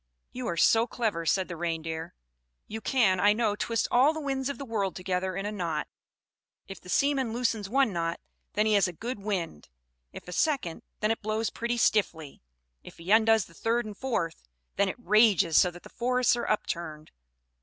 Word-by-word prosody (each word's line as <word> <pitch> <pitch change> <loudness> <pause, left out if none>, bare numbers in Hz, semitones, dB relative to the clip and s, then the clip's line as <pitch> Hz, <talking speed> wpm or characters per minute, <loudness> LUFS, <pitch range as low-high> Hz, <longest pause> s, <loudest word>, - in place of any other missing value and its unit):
"You 250 -1 -5
are 170 - -2
so 225 +7 +4
clever," 205 -11 -2
said 190 +3 +2
the 175 - -6
Reindeer; 160 - -4 0.5
"you 220 +1 -7
can, 215 -9 +2
I 205 +2 +5
know, 215 -2 0
twist 230 +1 -1
all 265 +6 +5
the 315 - -5
winds 270 -2 -2
of 280 - -4
the 275 - -6
world 205 -6 -2
together 185 0 -2
in 195 +1 -3
a 210 - -2
knot. 170 -7 -3 0.8
If 195 -2 -9
the 180 - -13
seaman 270 -1 +1
loosens 225 -4 -1
one 265 -3 +2
knot, 170 -1 -2 0.3
then 210 +2 +2
he 215 - +2
has 200 -2 +4
a 180 - -6
good 230 +6 -5
wind; 190 - -4 0.4
if - - -11
a - - -7
second, 255 - 0 0.2
then 215 +1 +2
it 225 - -2
blows 215 +1 -1
pretty 235 +1 -2
stiffly; 170 -10 0 0.4
if - - -13
he 170 +4 -5
undoes 220 -2 +5
the - - -18
third 230 +6 0
and 210 -1 -7
fourth, 195 -10 -2 0.3
then 200 0 +2
it - - -4
rages 215 -7 +4
so 180 - +6
that 175 0 -13
the - - -11
forests 250 +1 +1
are 240 - -3
upturned. 165 -7 -3
210 Hz, 195 wpm, -28 LUFS, 175-235 Hz, 0.8 s, so